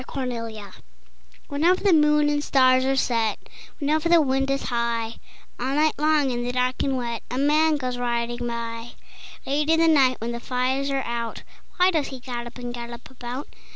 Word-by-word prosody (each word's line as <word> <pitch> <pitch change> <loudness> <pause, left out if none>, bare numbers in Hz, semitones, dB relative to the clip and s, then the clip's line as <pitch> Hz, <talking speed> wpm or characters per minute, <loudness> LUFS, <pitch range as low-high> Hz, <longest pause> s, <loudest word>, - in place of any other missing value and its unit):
IX 255 - -11
Windy 255 -3 -2 0.2
Nights 200 -2 -12 0.7
Whenever 335 +7 +2
the 395 -3 +5
moon 300 -1 +4
and 290 0 0
stars 255 -2 +4
are 270 0 +2
set, 230 -4 +1 0.4
Whenever 310 +2 0
the 340 -1 +7
wind 270 -2 +1
is 275 0 0
high, 235 -1 -1 0.4
All 260 +3 -1
night 305 +1 +3
long 300 -3 +3
in 240 0 -2
the 245 - -2
dark 250 0 0
and 270 -1 0
wet, 235 -2 -3
A 250 - -3
man 305 +3 +3
goes 250 -3 -3
riding 240 0 -2
by. 230 0 -5 0.5
Late 295 +3 0
in 325 0 +4
the 330 - +4
night 270 -5 +4
when 230 +2 -3
the 235 - -4
fires 260 +3 -1
are 275 -1 -1
out, 235 -1 -4 0.3
Why 365 +1 +5
does 315 -5 0
he 265 - -7
gallop 240 -1 -6
and 245 -1 -6
gallop 235 0 -8
about? 250 +2 -6
255 Hz, 190 wpm, -24 LUFS, 240-290 Hz, 0.7 s, the